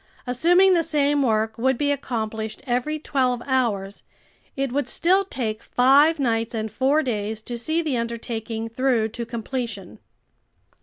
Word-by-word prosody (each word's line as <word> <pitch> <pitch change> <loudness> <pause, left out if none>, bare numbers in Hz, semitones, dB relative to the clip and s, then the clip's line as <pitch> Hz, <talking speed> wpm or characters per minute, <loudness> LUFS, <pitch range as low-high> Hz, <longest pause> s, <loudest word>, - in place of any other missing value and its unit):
Assuming 350 +10 +4
the 340 - +3
same 290 -2 +1
work 220 -3 0
would 265 +1 +2
be 285 +2 +1
accomplished 220 -5 -4
every 255 +5 -1
twelve 255 -5 0
hours, 215 -7 -1 0.5
it 275 -2 -2
would 280 -1 -1
still 370 +9 +3
take 230 - -4
five 280 +6 +4
nights 230 -4 -1
and 220 -1 -3
four 275 +7 +2
days 215 -3 -2
to 240 - -5
see 315 +8 -1
the 290 -6 -1
undertaking 230 -1 -4
through 230 -1 +1
to 235 +1 -6
completion. 230 -4 -5
245 Hz, 145 wpm, -23 LUFS, 225-285 Hz, 0.5 s, Assuming